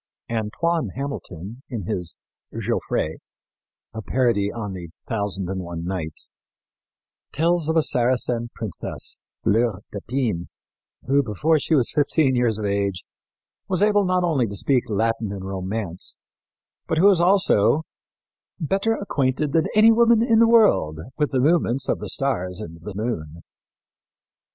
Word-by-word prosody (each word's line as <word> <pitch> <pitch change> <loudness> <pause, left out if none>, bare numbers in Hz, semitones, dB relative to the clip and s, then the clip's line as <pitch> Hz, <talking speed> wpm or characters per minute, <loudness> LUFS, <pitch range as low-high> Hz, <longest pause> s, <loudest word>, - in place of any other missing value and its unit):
Antoine 120 +6 -1
Hamilton, 120 - -6
in 115 -7 -4
his 90 -3 -4 0.4
Gaufrey 80 +1 -2 0.7
a 110 - -5
parody 115 -4 +1
on 105 -4 -5
The 90 -3 -7 0.2
Thousand 100 -4 -2
and 95 0 -3
One 85 -1 -6
Nights 90 -4 -4 1.0
tells 165 +1 +1
of 160 - +1
a 160 - +4
Saracen 120 -2 +1
princess, 110 -6 -5 0.2
Fleur 110 -2 +1
d'Épine, 105 -4 -2 0.6
who, 140 +2 +3
before 140 - +1
she 160 - +1
was 125 -5 +2
fifteen 145 -2 +2
years 120 -3 +1
of 105 - -3
age, 100 -2 -1 0.6
was 190 0 +1
able 205 -1 +4
not 185 -1 +1
only 145 -9 +1
to 100 - -6
speak 125 +4 +1
Latin 110 0 0
and 95 -1 -6
Romance, 95 -1 -4 0.7
but 160 - 0
who 175 - +4
was 195 -4 +6
also 175 - +4 0.8
"better 195 +8 +1
acquainted 145 - -1
than 160 -1 +3
any 220 +1 +7
woman 230 0 +5
in 230 -2 +4
the 230 0 +6
world 210 - +4 0.2
with 150 - +2
the 130 - 0
movements 135 -3 +2
of - - 0
the - - -5
stars 95 -9 0
and 85 -6 -8
the 100 +3 -8
moon." 85 -8 -4
120 Hz, 140 wpm, -23 LUFS, 100-160 Hz, 1.0 s, any